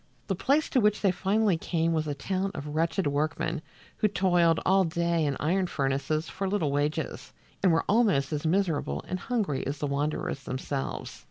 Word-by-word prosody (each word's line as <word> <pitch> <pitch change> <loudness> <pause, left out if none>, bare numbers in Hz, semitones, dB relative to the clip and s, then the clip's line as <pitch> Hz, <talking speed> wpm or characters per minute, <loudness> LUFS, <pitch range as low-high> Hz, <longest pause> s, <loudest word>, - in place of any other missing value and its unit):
The 195 - -1
place 285 - +2
to 265 - +4
which 210 0 +2
they 195 - +4
finally 195 +1 +1
came 165 -1 0
was 155 -1 0
a 145 - -2
town 190 +7 -1
of 145 +1 -5
wretched 165 +4 0
workmen 150 +2 -1 0.4
who 215 - +3
toiled 175 -4 +3
all 190 +1 +5
day 170 -1 0
in 140 - -1
iron 185 +5 +1
furnaces 140 +1 -1
for 195 0 -3
little 185 -8 0
wages, 150 +2 -2 0.3
and 185 - +4
were 165 - +2
almost 200 -10 +3
as 145 - -2
miserable 160 - 0
and 185 - -3
hungry 200 - -1
as 140 +2 -2
the 145 - -2
wanderers 145 0 -2
themselves. 135 +2 -4
165 Hz, 180 wpm, -28 LUFS, 145-190 Hz, 0.4 s, all